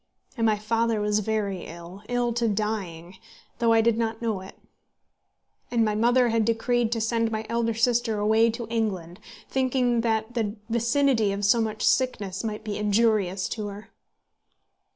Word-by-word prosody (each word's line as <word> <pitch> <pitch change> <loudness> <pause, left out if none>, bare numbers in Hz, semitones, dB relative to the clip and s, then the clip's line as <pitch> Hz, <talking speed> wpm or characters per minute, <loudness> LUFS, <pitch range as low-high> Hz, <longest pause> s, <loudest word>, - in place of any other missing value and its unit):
And 230 -3 +1
my 215 -1 +2
father 225 +1 0
was 210 0 +1
very 205 -3 -2
ill, 170 +3 -10
ill 245 -1 0
to 235 0 0
dying, 195 -5 -3 0.4
though 230 -1 +3
I 225 0 +5
did 230 0 +2
not 225 -1 -1
know 220 -5 -2
it. 190 - -12 1.1
And 230 -2 +2
my 210 - 0
mother 240 +3 +3
had 225 -1 +2
decreed 230 +1 +1
to 230 - -1
send 230 0 0
my 220 0 -3
elder 230 -1 0
sister 230 -1 +1
away 220 +2 +3
to 230 +1 -4
England, 200 -6 -3 0.3
thinking 255 -2 +1
that 220 0 -1
the 220 -3 -2 0.2
vicinity 235 -1 +2
of 200 +1 -2
so 230 +4 +4
much 220 -1 -3
sickness 205 -7 0
might 215 -1 -4
be 210 -2 -4
injurious 205 -3 +1
to 215 -2 -4
her. 205 +1 -9
220 Hz, 165 wpm, -25 LUFS, 210-235 Hz, 1.1 s, I